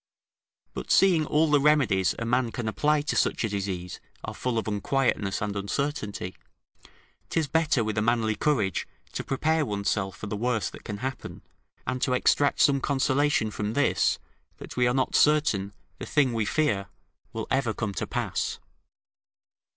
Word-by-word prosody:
But -, -, -6 dB
seeing 175 Hz, -6 st, +4 dB
all 155 Hz, +1 st, +2 dB
the 145 Hz, -, +5 dB
remedies 135 Hz, -, +3 dB
a 115 Hz, -, -3 dB
man 120 Hz, 0 st, +1 dB
can 120 Hz, -2 st, -4 dB
apply 145 Hz, +8 st, +1 dB
to 150 Hz, -, -2 dB
such -, -, +1 dB
a 110 Hz, -, 0 dB
disease, 95 Hz, -3 st, -4 dB, 0.2 s
are -, -, -5 dB
full 125 Hz, -2 st, -2 dB
of 110 Hz, -, -1 dB
unquietness 105 Hz, -2 st, 0 dB
and 105 Hz, -1 st, -3 dB
uncertainty, 105 Hz, -3 st, -3 dB, 0.9 s
'tis 160 Hz, -3 st, 0 dB
better 150 Hz, -4 st, +2 dB
with 110 Hz, 0 st, -1 dB
a -, -, +1 dB
manly 110 Hz, -1 st, +2 dB
courage 110 Hz, -11 st, 0 dB, 0.2 s
to -, -, -4 dB
prepare 155 Hz, +4 st, +1 dB
one's 100 Hz, -6 st, -1 dB
self 95 Hz, -3 st, -2 dB
for -, -, -7 dB
the 105 Hz, -, -4 dB
worst 115 Hz, 0 st, -1 dB
that -, -, -12 dB
can 105 Hz, +4 st, -5 dB
happen, 135 Hz, -1 st, -6 dB, 0.4 s
and 130 Hz, -, -2 dB
to 130 Hz, -, +1 dB
extract 140 Hz, +3 st, +2 dB
some 140 Hz, -1 st, +4 dB
consolation 140 Hz, -4 st, +1 dB
from 105 Hz, +1 st, -3 dB
this, 145 Hz, +3 st, +2 dB, 0.4 s
that -, -, -10 dB
we 125 Hz, -1 st, +3 dB
are 120 Hz, -, +1 dB
not 130 Hz, -, 0 dB
certain 150 Hz, -11 st, +3 dB, 0.3 s
the -, -, -6 dB
thing 135 Hz, -5 st, +2 dB
we 110 Hz, -2 st, 0 dB
fear 105 Hz, -7 st, 0 dB, 0.4 s
will -, -, -4 dB
ever 130 Hz, -3 st, +1 dB
come 110 Hz, -2 st, -3 dB
to -, -, -3 dB
pass. -, -, -2 dB
120 Hz, 170 wpm, -27 LUFS, 105-145 Hz, 0.9 s, the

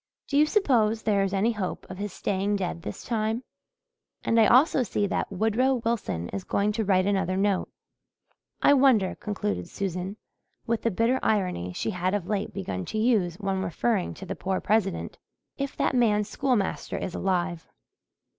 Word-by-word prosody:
Do 280 Hz, -, -3 dB
you 300 Hz, +2 st, +5 dB
suppose 230 Hz, -, +2 dB
there 205 Hz, -2 st, +2 dB
is 195 Hz, -1 st, 0 dB
any 200 Hz, +4 st, +2 dB
hope 210 Hz, -5 st, -4 dB
of 185 Hz, 0 st, -8 dB
his 205 Hz, 0 st, -3 dB
staying 200 Hz, +2 st, -1 dB
dead 180 Hz, -3 st, -3 dB
this -, -, -7 dB
time? 225 Hz, +1 st, -1 dB, 0.8 s
And 230 Hz, -, +3 dB
I 220 Hz, -, +6 dB
also 265 Hz, +4 st, +5 dB
see 205 Hz, -3 st, 0 dB
that 200 Hz, -, -2 dB
Woodrow 225 Hz, +7 st, +2 dB
Wilson 225 Hz, -, -2 dB
is 100 Hz, -1 st, -4 dB
going 205 Hz, +1 st, +1 dB
to 220 Hz, +1 st, -1 dB
write 185 Hz, -2 st, +3 dB
another 190 Hz, -2 st, +1 dB
note. 195 Hz, -1 st, +1 dB, 0.9 s
I -, -, +7 dB
wonder," 260 Hz, -9 st, +4 dB
concluded 210 Hz, 0 st, -3 dB
Susan, 190 Hz, +1 st, -4 dB, 0.5 s
with 230 Hz, -1 st, 0 dB
the 230 Hz, -, +1 dB
bitter 230 Hz, +6 st, +1 dB
irony 180 Hz, -, 0 dB
she 220 Hz, -, -2 dB
had 185 Hz, +1 st, 0 dB
of 200 Hz, -4 st, -2 dB
late 205 Hz, +1 st, -2 dB
begun 180 Hz, -, -4 dB
to -, -, -4 dB
use 215 Hz, -7 st, +2 dB
when 195 Hz, -1 st, -2 dB
referring 190 Hz, +2 st, -1 dB
to 190 Hz, -, -9 dB
the -, -, -4 dB
poor 190 Hz, 0 st, -2 dB
President, 205 Hz, -3 st, 0 dB, 0.4 s
"if 275 Hz, 0 st, -3 dB
that -, -, +1 dB
man's 210 Hz, -4 st, +3 dB
schoolmaster 250 Hz, -8 st, -1 dB
is 180 Hz, -, -4 dB
alive." 180 Hz, -3 st, -1 dB
205 Hz, 175 wpm, -27 LUFS, 190-230 Hz, 0.9 s, I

